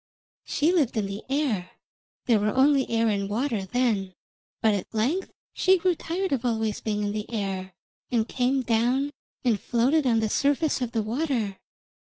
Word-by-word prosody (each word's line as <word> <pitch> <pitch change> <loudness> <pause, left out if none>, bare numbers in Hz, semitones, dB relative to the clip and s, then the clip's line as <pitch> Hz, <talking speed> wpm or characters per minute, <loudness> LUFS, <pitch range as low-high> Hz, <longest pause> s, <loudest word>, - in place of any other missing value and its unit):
She 315 +4 +1
lived 285 -10 +1
in 210 - +1
the 195 +1 -5
air 265 -10 -1 0.5
there 230 -4 +4
were 210 +2 0
only 275 0 +4
air 230 0 +2
and 200 -2 0
water 225 -2 -1
then 210 -6 0 0.4
but 220 -2 +3
at 200 - -3
length 275 - 0 0.2
she 380 0 +4
grew 365 +1 +2
tired 355 +3 -3
of 265 -3 0
always 220 -3 -1
being 210 -1 -1
in 205 - -1
the 210 0 -4
air, 190 -4 -3 0.4
and 230 -2 +1
came 260 +1 +1
down 245 +5 +1 0.3
and 225 -4 +3
floated 260 +5 +2
on 230 -2 +3
the 220 - +1
surface 285 +5 +1
of 240 -2 -2
the 225 -2 0
water. 230 -4 -1
235 Hz, 170 wpm, -26 LUFS, 210-275 Hz, 0.5 s, there